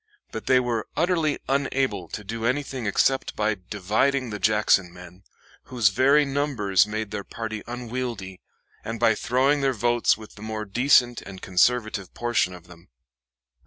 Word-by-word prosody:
But 110 - -7
they 130 -1 +5
were 120 -3 -2
utterly 165 -2 +1
unable 130 -8 0
to 105 - -7
do 110 +3 -5
anything 130 -1 -1
except 135 +6 +1
by 105 -1 0
dividing 110 +6 0
the 105 - -5
Jackson 105 -4 +2
men, 90 +1 -13 0.4
whose 120 -6 +2
very 140 +8 +4
numbers 130 -10 +1
made 110 -1 -4
their 105 -1 -4
party 110 -1 -6
unwieldy, 120 -6 -5 0.4
and 115 0 -5
by 115 -1 +4
throwing 130 +6 +1
their 135 -1 +2
votes 120 0 +2
with 110 -1 -12
the 105 - -14
more 110 0 -4
decent 120 +2 +3
and 95 -1 -10
conservative 105 +1 +1
portion 120 -6 0
of 90 -1 -14
them. 90 0 -17
115 Hz, 155 wpm, -24 LUFS, 100-130 Hz, 0.4 s, they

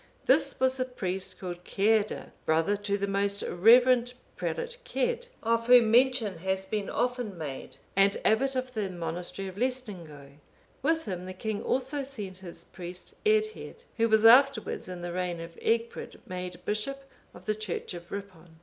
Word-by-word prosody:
This - - +3
was 260 0 +2
a 255 - +1
priest 190 -7 -3
called 175 -1 -6
Ceadda,(496) 215 +3 +1 0.2
brother 165 +6 +3
to 205 0 -2
the 200 - -1
most 200 0 0
reverend 245 +5 +5 0.2
prelate 485 0 -3
Cedd, - - -1 0.2
of 230 0 +1
whom 245 -3 +7
mention 240 -6 +3
has 190 +2 -1
been 205 0 -3
often 245 -6 -1
made, 145 -5 -7 0.2
and 195 +1 +4
abbot 265 +5 +3
of 255 0 -2
the 210 -4 -2
monastery 175 +2 -4
of 190 0 -9
Laestingaeu. 175 - -4 0.4
With 320 +3 +1
him 185 -3 -5
the 185 - -6
king 210 +2 -3
also 265 +3 -1
sent 210 -9 -6
his 170 -2 -9
priest 180 +1 -8
Eadhaed,(497) 435 +2 0
who 230 0 +3
was 220 0 +4
afterwards, 270 +4 +5
in 180 -1 -7
the 175 0 -4
reign 180 -1 -2
of 165 0 -8
Egfrid,(498) 230 +1 -1
made 180 -1 -6
bishop 275 +7 -2 0.3
of - - -13
the 215 - +1
church 215 -5 -4
of 175 0 -10
Ripon. 185 -5 -8
205 Hz, 165 wpm, -29 LUFS, 180-250 Hz, 0.4 s, whom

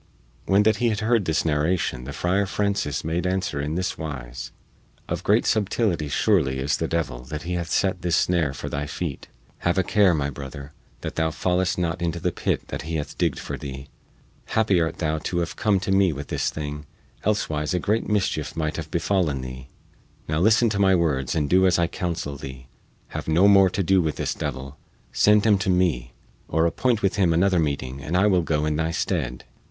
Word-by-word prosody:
When 100 +2 +4
that 110 0 +3
he 120 -1 +2
had 110 0 -1
heard 110 -2 +2
this 80 0 0
narration 75 -4 0
the 70 - -6
Friar 95 +6 0
Francis 100 -8 -1
made 85 +3 -1
answer 90 -6 -1
in 75 +2 -3
this 95 +1 -2
wise: 65 -5 -6 0.6
"Of - - -3
great - - +3
subtility 100 -7 +1
surely 75 -4 +2
is 70 +3 0
the 80 - -1
devil 75 -8 -2
that 75 +3 -6
he 90 +2 -3
hath 85 -1 -3
set 95 -2 +1
this 90 -2 +1
snare 85 -5 +2
for - - -7
thy 75 +1 -3
feet. 75 -1 -5 0.3
Have 85 +2 0
a 95 - +3
care, 100 -3 +4
my 70 -2 -1
brother, 70 +1 -8 0.3
that - - -6
thou 80 0 +2
fallest 90 +3 0
not 85 0 -1
into 85 0 -1
the 90 +1 0
pit - - -1
which - - -5
he 80 +2 -4
hath 75 -2 -4
digged - - 0
for - - -5
thee! 65 0 -7 0.6
Happy 105 -5 +2
art 80 - -1
thou 80 -1 -1
to 85 +3 -3
have 85 -1 -2
come 105 -3 +2
to 95 +1 -2
me 95 -2 +4
with 70 -1 -7
this - - 0
thing, 75 -1 -6 0.4
elsewise 80 -7 0
a - - +1
great 110 +4 0
mischief 95 -9 0
might 80 -1 -2
have 80 -2 -5
befallen 85 -6 0
thee. 65 +1 -8 0.6
Now 75 +1 0
listen 110 +5 +4
to 100 - -1
my 95 -1 +5
words 75 -5 0
and 75 -3 +1
do 95 +4 +4
as 90 - +3
I 85 - +3
counsel 85 -4 -3
thee. 65 -1 -9 0.4
Have - - -6
no 85 +5 +5
more 100 -2 +6
to 95 +2 -1
do 95 +1 +4
with 80 -2 -1
this - - -2
devil; 70 0 -5 0.4
send 105 0 +4
him 105 -3 +4
to 95 0 -1
me, 80 -10 +1 0.3
or 80 +1 +1
appoint 115 +6 +1
with 95 +1 +1
him 95 -4 +3
another 90 +2 +3
meeting 70 -3 -2
and 75 +5 -1
I 95 - +4
will 95 -4 +4
go 75 -2 0
in 75 -1 0
thy 80 0 0
stead." 80 -7 -2
85 Hz, 210 wpm, -24 LUFS, 75-95 Hz, 0.6 s, more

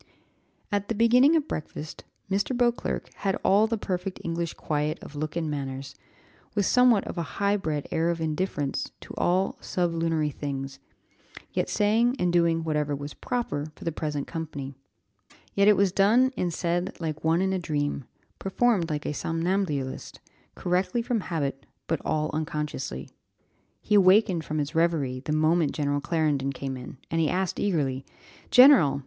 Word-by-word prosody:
At 205 0 0
the 230 - 0
beginning 250 +7 +5
of 310 -2 +1
breakfast, 155 0 -6 0.2
Mr. 200 +6 0
Beauclerc 240 -1 0
had 195 -1 0
all 205 +3 +5
the 230 0 -1
perfect 185 -2 -3
English 170 -1 -3
quiet 150 +1 -1
of - - -10
look 155 +1 -4
and 170 -2 -1
manners, 135 -2 -4 0.6
with 205 -2 +2
somewhat 250 -3 +5
of - - -5
a 165 - -6
high 200 0 +2
bred 155 -7 -2
air 165 +1 +1
of 170 -1 -1
indifference 155 -3 -2
to - - -10
all 185 +2 +1
sublunary 165 -3 0
things, 135 -1 -5 0.7
yet - - 0
saying 225 +4 +2
and 180 -4 +1
doing 170 -1 +3
whatever 150 -2 0
was 145 +1 -7
proper 235 - -3
for - - -12
the 165 - -1
present 150 -2 -3
company; 145 -5 -5 0.8
yet 200 0 +3
it 210 - +6
was 195 -2 +3
done 225 +8 +4
and 175 - -1
said 175 +2 -2
like 155 -2 -4
one 165 +2 +3
in 190 0 +1
a 190 - 0
dream, 145 -5 -2 0.3
performed 195 -3 +1
like 150 -1 -3
a - - -1
somnambulist, 165 -4 -2 0.4
correctly 185 +6 0
from 235 -1 0
habit, 140 -7 -3 0.2
but 165 -2 -1
all 155 0 0
unconsciously. 150 - -3 0.8
He 210 - -1
awakened 190 -3 +5
from 155 - -3
his 145 -1 -2
reverie 160 -6 +1
the 140 - -5
moment 155 +1 +2
General 145 -1 0
Clarendon 150 -3 0
came 135 0 -4
in, 130 +1 -9
and 165 0 +1
he 155 - +2
asked 185 0 -1
eagerly, 140 -9 0 0.5
"General! 250 - +7
165 Hz, 160 wpm, -26 LUFS, 150-195 Hz, 0.8 s, General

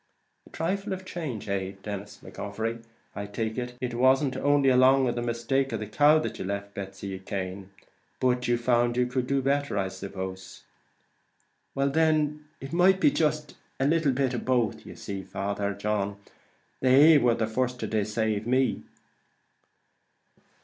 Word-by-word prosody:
"A - - -16
trifle 195 +4 -2
of 190 0 -7
change, 155 - -5
eh! 95 -1 -2
Then, 100 -2 -3
Mr. 105 +1 -13
McGovery, 110 +3 -4 0.3
I 100 0 -4
take 110 +2 -3
it, 125 0 -5
it 125 -1 -3
wasn't 130 +3 +3
only 145 -1 +3
along 130 +1 +5
of 120 - 0
the 120 - -3
mistake 120 +3 -1
about 110 - -3
a - - -18
cow 150 +5 +5
that 155 - -3
you - - -4
left 100 +1 -4
poor 100 - -4
Betsy 95 0 -7
Cane, 95 0 -5 0.5
but 125 -1 +1
you 120 0 +2
found 120 0 +1
you 125 - +3
could 125 0 -2
do 140 0 0
better, 140 -4 0
I 95 -1 0
suppose." 95 0 -7 1.1
"Well 140 0 +1
then, 150 -1 +1
it 135 +3 -8
might 185 +2 +4
be 285 - +4
jist 150 - -1 0.2
a 135 - +2
little 160 0 +2
of 130 -3 0
both; 120 -5 +1
but - - -19
you - - -9
see, 100 -1 -6
Father 100 +1 -3
John, 100 -1 -2 0.6
they 145 +4 +7
war 120 -3 +3
the 110 - 0
first 125 +3 -2
to - - -2
decave 110 0 -1
me." 130 +1 +1
120 Hz, 170 wpm, -27 LUFS, 100-140 Hz, 1.1 s, they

